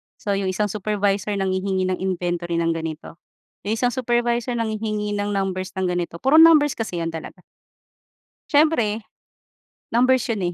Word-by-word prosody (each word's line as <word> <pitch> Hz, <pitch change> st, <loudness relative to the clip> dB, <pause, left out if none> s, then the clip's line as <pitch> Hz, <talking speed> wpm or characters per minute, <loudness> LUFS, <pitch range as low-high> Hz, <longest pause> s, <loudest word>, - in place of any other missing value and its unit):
so 205 Hz, -, -4 dB
yung 195 Hz, -1 st, 0 dB
isang 200 Hz, +2 st, -1 dB
supervisor 205 Hz, 0 st, -1 dB
nanghihingi 190 Hz, 0 st, -1 dB
ng 185 Hz, 0 st, -1 dB
inventory 175 Hz, -2 st, -2 dB
ng 165 Hz, 0 st, +1 dB
ganito, 160 Hz, 0 st, -6 dB, 0.5 s
yung 215 Hz, -, +1 dB
isang 245 Hz, +2 st, +1 dB
supervisor 240 Hz, -1 st, 0 dB
nanghihingi 215 Hz, -2 st, -2 dB
ng 205 Hz, 0 st, -2 dB
numbers 190 Hz, -1 st, -2 dB
ng 190 Hz, -1 st, -1 dB
ganito, 175 Hz, -1 st, -3 dB
puro 285 Hz, +4 st, +6 dB
numbers 315 Hz, -3 st, +7 dB
kasi 215 Hz, -9 st, -4 dB
yan 165 Hz, -, -2 dB
talaga. 165 Hz, +3 st, -9 dB, 1.1 s
Siyempre 285 Hz, -8 st, +2 dB, 0.9 s
numbers 255 Hz, +2 st, +3 dB
yun, 215 Hz, -4 st, -1 dB
205 Hz, 140 wpm, -22 LUFS, 185-235 Hz, 1.1 s, numbers